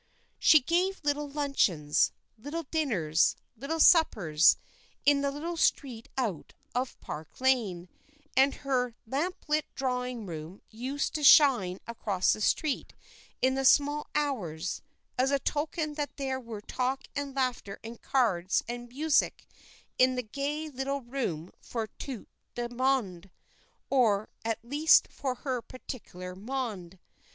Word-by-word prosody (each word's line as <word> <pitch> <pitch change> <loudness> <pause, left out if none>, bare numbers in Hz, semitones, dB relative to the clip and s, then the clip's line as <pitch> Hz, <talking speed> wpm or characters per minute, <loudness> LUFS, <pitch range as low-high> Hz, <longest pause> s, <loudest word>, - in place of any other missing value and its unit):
She 310 - +7
gave 360 +7 +1
little 290 0 0
luncheons, 270 - +1 0.2
little 290 +9 -5
dinners, 210 - +1 0.2
little 280 +8 -4
suppers, 185 - +5 0.5
in 285 -1 +5
the 280 - +1
little 325 +5 -4
street 245 -7 0
out 215 - -3 0.2
of 250 +1 -2
Park 155 +1 -8
Lane, 225 -10 +1 0.5
and 270 +1 +4
her 250 -3 0
lamp 300 +11 -3
lit 300 0 +1
drawing 250 -3 -2
room 165 +1 -8
used 260 +6 -3
to 305 - -3
shine 245 -12 +6
across 205 -5 0
the 215 - -5
street 290 +6 0 0.5
in 260 0 +4
the 270 0 -1
small 290 +2 +4
hours, 185 - -2 0.4
as 260 +1 +3
a 280 - +3
token 300 +3 -2
that 295 -1 -4
there 265 -2 -2
were 230 -4 -8
talk 260 +5 -2
and 280 -1 -4
laughter 250 -7 -2
and 230 +1 -9
cards 195 -9 +1
and 240 0 -6
music 295 +4 +1 0.5
in 255 0 +5
the 250 - -2
gay 285 +7 -3
little 275 0 -3
room 235 - -4
for 230 -2 -3
tout 260 -6 -6 0.3
le 240 0 -2
monde, 235 -9 0 0.6
or 220 -6 +3
at 225 -1 -1
least 295 +6 +5
for 260 -2 -3
her 255 -1 -3
particular 185 -8 -8
monde. 205 -5 -5
255 Hz, 135 wpm, -29 LUFS, 215-285 Hz, 0.6 s, She